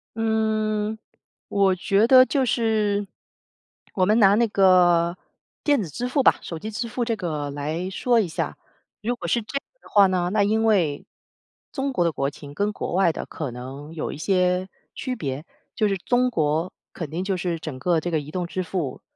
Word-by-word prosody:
嗯， 220 -1 0 0.5
我 195 -2 +3
觉 200 +4 +2
得 255 0 +8
就 275 0 +1
是， 215 -4 +1 0.9
我 185 - +2
们 215 +2 +4
拿 200 -2 +6
那 235 +2 +3
个 180 -4 +4 0.5
电 290 -5 +3
子 - - -5
支 240 - -3
付 265 +2 +1
吧， - - +5
手 165 - -6
机 215 +7 -6
支 230 +2 -3
付 235 +2 -2
这 230 -1 0
个 155 -7 -3
来 155 +6 -3
说 240 +4 +2
一 210 - +1
下。 165 - -3 0.4
如 240 +3 -1
果 - - -6
是 235 - +1
这 275 - -4
样 - - -3 0.2
的 - - -17
话 200 -2 +6
呢， 180 -1 0
那 210 -1 +3
因 220 +2 +1
为 175 -10 +2 0.7
中 275 -1 -2
国 180 - +2
的 170 - +2
国 140 -2 -1
情 145 0 -11
跟 205 +5 0
国 - - -4
外 185 -2 +3
的 - - -5
可 150 -6 -5
能 135 +5 -8
有 160 - -4
一 - - -7
些 180 +2 +1 0.3
区 255 -2 -3
别， 145 - -4 0.3
就 215 - +2
是 200 - 0
中 250 +6 +2
国 160 -2 0 0.2
肯 165 -4 -6
定 170 +3 -2
就 190 -1 -1
是 175 -2 -2
整 155 -4 -6
个 165 +5 +1
这 175 - -3
个 160 -2 +1
移 150 +1 -9
动 180 0 -3
支 185 +1 -3
付， 160 -6 -4
190 Hz, 215 characters per minute, -24 LUFS, 165-220 Hz, 0.9 s, 得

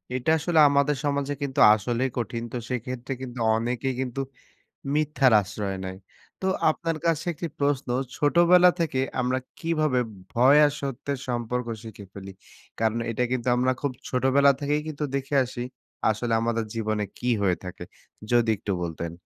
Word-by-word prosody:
এটা 130 +5 +1
আসলে 165 0 +2
আমাদের 140 +1 +2
সমাজে 140 0 0
কিন্তু 140 -2 -2 0.2
আসলেই 120 +4 -1
কঠিন, 115 0 -3
তো - - -2
সেইক্ষেত্রে 125 +1 -4
কিন্তু 125 -1 -7 0.2
অনেকেই 120 +3 -1
কিন্তু 130 +1 -3 0.7
মিথ্যার 150 -4 +3
আশ্রয় 100 0 -4
নেয়। 95 0 -6 0.4
তো 190 - -3 0.2
আপনার 165 +1 -2
কাছে 165 -1 +1
একটি 170 +2 -5
প্রশ্ন, 140 -1 0 0.3
ছোটবেলা 175 +5 +5
থেকে 155 -6 0 0.2
আমরা 130 +1 0 0.2
কিভাবে 155 -5 +1 0.3
ভয় 130 +5 +6
আর 145 - +2
সত্যের 140 +1 -3
সম্পর্ক 120 0 -2 0.2
শিখে 105 -3 -10
ফেলি? 95 -1 -8 0.5
কারণ 115 +1 +1
এটা 125 +2 0
কিন্তু 130 -1 -2
আমরা 125 +1 +2
খুব 145 - 0 0.2
ছোটবেলা 135 +2 +4
থেকেই 145 +1 0
কিন্তু 150 -1 -4
দেখে 140 +1 -2
আসি, 120 0 -6 0.5
আসলে 115 +2 -1
আমাদের 115 0 0
জীবনে 110 -1 -1 0.2
কি 125 - -4 0.2
হয়ে 90 -2 +2
থাকে। 90 -1 -7 0.5
যদি 120 -1 +3
একটু 100 0 -4
বলতেন। 85 0 -4
130 Hz, 155 wpm, -25 LUFS, 115-145 Hz, 0.7 s, ভয়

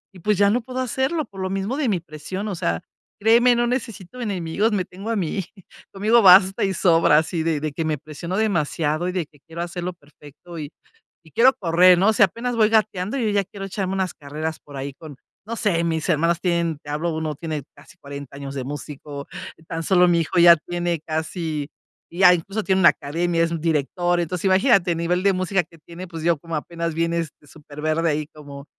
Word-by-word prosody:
y - - -12
pues 210 +2 +1
ya 200 0 +4
no 240 +3 +1
puedo 255 +2 -6
hacerlo 265 +5 -1
por 195 -1 -10
lo 185 - -2
mismo 195 +6 -2
de 275 -6 0
mi 185 -4 +1
presión 170 +6 -6
o 195 - -3
sea 85 - -2 0.4
créeme 235 +3 +5
no 240 0 +2
necesito 240 -2 -4
enemigos 200 +1 -1
me 190 -4 0
tengo 195 +5 -8
a 230 - 0
mí 185 +2 -2 0.5
conmigo 220 +4 +3
basta 190 +1 +7
y 195 -1 +1
sobra 165 -4 +4
así 160 +1 -2
de 160 -3 0
de 150 -1 -4
que 165 - -2
me 155 -2 0
presiono 160 +6 -6
demasiado 170 -5 0
y - - -1
de 180 -4 -2
que 145 -3 -24
quiero 165 +1 -7
hacerlo 175 +1 -4
perfecto 150 +2 -14
y 145 +1 -6 0.5
y 160 - -18
quiero 250 +4 +5
correr 180 0 +5
no 210 +4 +4
sé 210 - +5
apenas 235 +6 -1
voy 215 -1 +4
gateando 215 +1 +1
yo 230 -4 0
ya 200 -1 +1
quiero 195 +1 -8
echarme 195 -1 -3
unas 190 -2 -1
carreras 155 +2 -5
por 140 -2 -11
ahí 135 0 -5
con 145 -2 -12 0.3
no 230 - -3
sé, 170 -6 +1
mis 160 0 -1
hermanos 165 +2 +2
tienen, 170 -3 0
te 145 - -11
hablo 160 +3 -2
uno 155 -2 -3
tiene 155 -3 -5
casi 185 - -18
40 140 -1 -9
años 140 -1 -7
de 130 - -3
músico, 145 0 -7 0.4
tan 165 0 -4
solo 180 +1 +4
mi 170 -1 +3
hijo 175 +2 0
ya 170 0 +9
tiene 175 0 -3
casi 160 -2 -3 0.4
ya 180 +1 +6
incluso 195 +5 -3
tiene 190 -1 +2
una 170 - +8
academia, 165 +3 -1
es 165 - -1
un 165 - -2
director, 170 +3 0
entonces 175 +3 -3
imagínate, 190 -2 +4
a - - 0
nivel 175 +2 0
de 200 -1 +4
música 185 0 0
que 165 +1 -20
tiene, 175 +3 -10
pues 165 -2 -8
yo 170 -2 +2
como 165 +2 -6
apenas 170 +1 -3
vienes 165 -1 -1
de 150 - -21
súper 150 -1 -12
verde 155 +1 +1
ahí 150 0 -1
como 140 -2 -11
170 Hz, 215 wpm, -22 LUFS, 155-195 Hz, 0.5 s, ya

